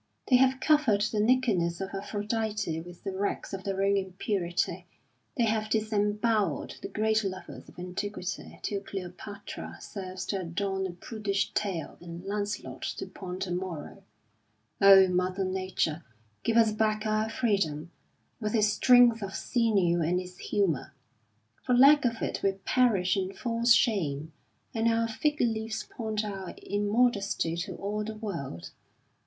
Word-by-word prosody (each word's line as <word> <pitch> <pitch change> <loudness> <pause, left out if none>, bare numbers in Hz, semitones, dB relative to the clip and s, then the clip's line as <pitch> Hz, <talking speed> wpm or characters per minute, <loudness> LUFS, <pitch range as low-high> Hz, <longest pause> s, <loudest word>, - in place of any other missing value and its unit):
They 255 - +7
have 265 +1 +3
covered 280 -9 +3
the 215 0 0
nakedness 210 -8 +2
of 195 0 -4
Aphrodite 210 -3 -2
with 175 +1 -12
the 195 - -4
rags 200 +1 -2
of 190 -1 -5
their 195 0 -1
own 200 0 +3
impurity. 190 -1 -2 0.5
They 240 - +3
have 215 -1 0
disembowelled 210 - 0
the - - -4
great 220 0 +1
lovers 185 -1 -6
of - - -18
antiquity 185 +1 -5
till 200 -1 -2
Cleopatra 200 +1 -7
serves 185 -2 -6
to 195 -2 -2
adorn 190 +2 -2
a - - -6
prudish 200 +1 -2
tale 190 -6 -3
and 175 +1 -9
Lancelot 205 +1 -3 0.2
to - - -4
point 185 -1 -6
a 180 - -6
moral. 175 -3 -5 0.8
Oh, 195 -1 +9
Mother 185 +1 0
Nature, 185 -4 -1 0.4
give 230 - +1
us 225 -2 +5
back 215 0 0
our 215 0 +1
freedom, 175 -9 0 0.5
with 215 -1 -1
its 215 -1 +4
strength 245 -2 +6
of 195 -1 -5
sinew 200 -8 +2
and 175 +3 +1
its 180 0 -9
humour! 165 -8 -1 0.7
For 250 - +1
lack 285 +2 +7
of 230 -1 0
it - - -2
we 195 - +2
perish 195 -2 +2
in 190 -1 -2
false 235 0 0
shame, 160 - +1 0.4
and 225 0 +1
our 230 0 +2
fig 295 +6 -1
leaves 220 -2 -1
point 220 -2 -3
our 195 -3 -6
immodesty 205 -4 +1
to 170 - -4
all 210 +2 -3
the 220 +1 -5
world. 155 - -6
205 Hz, 150 wpm, -29 LUFS, 185-220 Hz, 0.8 s, Oh